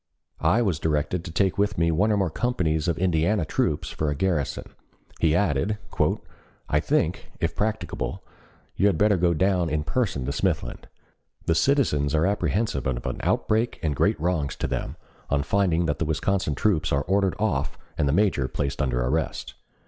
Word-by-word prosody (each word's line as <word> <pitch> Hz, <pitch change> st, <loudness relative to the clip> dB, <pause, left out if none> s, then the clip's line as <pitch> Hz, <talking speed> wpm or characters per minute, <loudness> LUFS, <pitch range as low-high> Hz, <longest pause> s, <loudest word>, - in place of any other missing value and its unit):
I 120 Hz, +3 st, +3 dB
was 90 Hz, -8 st, 0 dB
directed 80 Hz, +2 st, 0 dB
to 85 Hz, -, -6 dB
take 95 Hz, +3 st, +1 dB
with 105 Hz, 0 st, +1 dB
me 85 Hz, 0 st, +2 dB
one 100 Hz, +7 st, +2 dB
or 105 Hz, -, +2 dB
more 95 Hz, -5 st, 0 dB
companies 85 Hz, -9 st, 0 dB
of 85 Hz, -3 st, 0 dB
Indiana 90 Hz, +1 st, +1 dB
troops 75 Hz, 0 st, -1 dB
for 75 Hz, -, -1 dB
a 75 Hz, -, -1 dB
garrison. 80 Hz, -3 st, -1 dB, 0.6 s
He 80 Hz, -2 st, +3 dB
added: 95 Hz, +3 st, +1 dB, 0.9 s
"I -, -, +2 dB
think, -, -, 0 dB
if -, -, -1 dB
practicable, 110 Hz, +1 st, -2 dB, 0.5 s
you 100 Hz, -, +3 dB
had 95 Hz, -6 st, +2 dB
better 105 Hz, +2 st, +4 dB
go 85 Hz, -1 st, +2 dB
down 90 Hz, 0 st, +2 dB
in 75 Hz, 0 st, -1 dB
person 90 Hz, -, -1 dB
to 70 Hz, -, -1 dB
Smithland. 65 Hz, -3 st, -2 dB, 0.6 s
The 80 Hz, -, +3 dB
citizens 80 Hz, -, +2 dB
are 80 Hz, +1 st, +3 dB
apprehensive 100 Hz, -, 0 dB
of -, -, -2 dB
an -, -, -2 dB
outbreak 110 Hz, +2 st, 0 dB
and 75 Hz, -3 st, 0 dB
great -, -, +2 dB
wrongs 80 Hz, -4 st, -1 dB
to -, -, -2 dB
them, -, -, -3 dB, 0.3 s
on 70 Hz, 0 st, +1 dB
finding 90 Hz, -1 st, +1 dB
that 75 Hz, -3 st, -1 dB
the 80 Hz, -, 0 dB
Wisconsin 80 Hz, +1 st, 0 dB
troops 85 Hz, -2 st, +1 dB
are 70 Hz, 0 st, +1 dB
ordered 95 Hz, +2 st, +1 dB
off 85 Hz, -9 st, -1 dB, 0.2 s
and 75 Hz, -, +1 dB
the -, -, +3 dB
major 90 Hz, -7 st, +2 dB
placed 70 Hz, +1 st, -2 dB
under 60 Hz, -2 st, 0 dB
arrest. 75 Hz, +5 st, -2 dB
85 Hz, 180 wpm, -25 LUFS, 75-100 Hz, 0.9 s, better